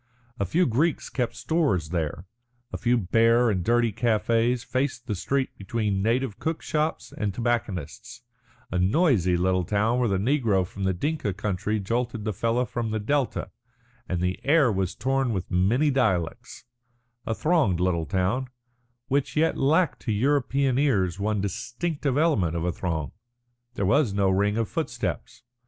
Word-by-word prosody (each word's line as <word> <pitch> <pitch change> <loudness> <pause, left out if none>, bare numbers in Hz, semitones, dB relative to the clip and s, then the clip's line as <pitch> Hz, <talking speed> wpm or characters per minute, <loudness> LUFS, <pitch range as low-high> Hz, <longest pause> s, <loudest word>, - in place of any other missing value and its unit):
A 100 - 0
few 175 - +2
Greeks 145 +7 0
kept 125 -3 -2
stores 140 - 0
there, 85 0 -3 0.5
a - - -2
few 120 0 +2
bare 115 +3 +3
and 90 -3 -1
dirty 120 0 +2
cafés 115 +1 +1
faced 130 +1 -2
the 110 - -2
street 130 +8 -1
between 100 -1 -1
native 115 +1 0
cook 160 0 -3
shops 155 +1 -2
and 105 -2 -1
tobacconists'; 120 - -3 0.5
a 90 - 0
noisy 95 - +3
little 90 +1 +1
town 110 +6 +1
where 120 -3 +2
the 95 - +1
negro 110 -4 +1
from 95 +2 -6
the 95 - +2
Dinka 140 - -2
country 105 +1 -2
jolted 115 +2 -2
the 110 - -1
fellah 115 +5 0
from 115 0 -3
the 110 - -1
Delta, 135 +5 -1 0.6
and 90 -1 -1
the 90 +1 -1
air 145 -3 +4
was 95 -3 -1
torn 135 -2 0
with 95 -2 -4
many 115 +12 +2
dialects; 110 -3 -1 0.6
a 110 - 0
thronged 150 - +2
little 85 -3 0
town, 105 +8 0 0.6
which 140 0 0
yet 160 +1 +3
lacked 160 +5 +2
to 115 - -2
European 135 +2 +1
ears 100 - +1
one 105 0 0
distinctive 130 - -2
element 125 - +2
of 85 - -2
a 90 - +1
throng. 80 -3 -3 0.6
There 100 - -1
was 120 -1 +2
no 100 -1 +2
ring 100 +3 +1
of 115 -2 0
footsteps. - - -4
115 Hz, 160 wpm, -26 LUFS, 95-130 Hz, 0.6 s, air